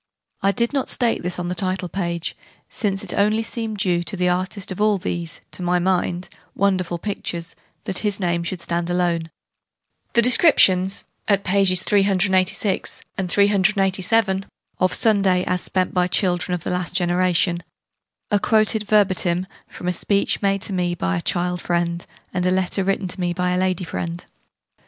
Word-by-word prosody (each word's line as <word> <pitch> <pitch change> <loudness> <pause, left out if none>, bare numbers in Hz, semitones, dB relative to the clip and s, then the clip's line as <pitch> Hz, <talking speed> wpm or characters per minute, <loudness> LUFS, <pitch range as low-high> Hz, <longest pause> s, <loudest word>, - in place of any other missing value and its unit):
I 195 - +3
did 235 +5 0
not 275 -2 -1
state 240 -3 0
this 180 +1 -3
on 175 -1 -3
the 180 - -2
title 185 0 -1
page, 170 -2 -3 0.3
since 195 -3 -2
it - - +1
seemed - - +1 0.5
only 215 - -5
due, 180 -3 +1
to 175 +3 -5
the 180 0 +1
artist 185 +2 -2
of 185 - -4
all 210 -1 +3
these 170 -2 -4
(to - - -9
my 180 0 +1
mind) 180 0 0 0.3
wonderful 185 -3 0
pictures, 170 -3 -4 0.3
that 190 - -2
his 205 -2 -1
name 170 -2 0
should 170 +1 -4
stand 170 0 -2
there 175 - -1
alone. 170 -2 0 0.8
The 235 - +4
descriptions, 200 - +5 0.2
at 200 -1 +2
pp. 190 -1 +3
386, 195 -1 +1 0.2
387, 195 +1 +2 0.3
of 185 0 +2
Sunday 195 -5 +2
as 180 -1 -1
spent 185 -1 -1
by 180 -1 +2
children 180 -1 0
of 175 - -7
the - - -3
last 180 0 -3
generation, 175 -1 +1 0.7
are 205 - +3
quoted 215 0 +2
verbatim 185 -4 +2 0.2
from 180 - -8
a 180 - +1
speech 200 +3 0
made 195 -1 +1
to 200 - -3
me 175 -1 0
by 90 - -1
a 85 - -2
child 180 - -1
friend 170 0 -1 0.3
and 180 -1 -1
a - - +3
letter 190 +1 0
written 195 0 -1
to 180 - -6
me 175 -1 0
by 180 +1 -1
a 180 - +1
lady 185 -1 0
friend. 170 0 -5
185 Hz, 170 wpm, -21 LUFS, 175-195 Hz, 0.8 s, descriptions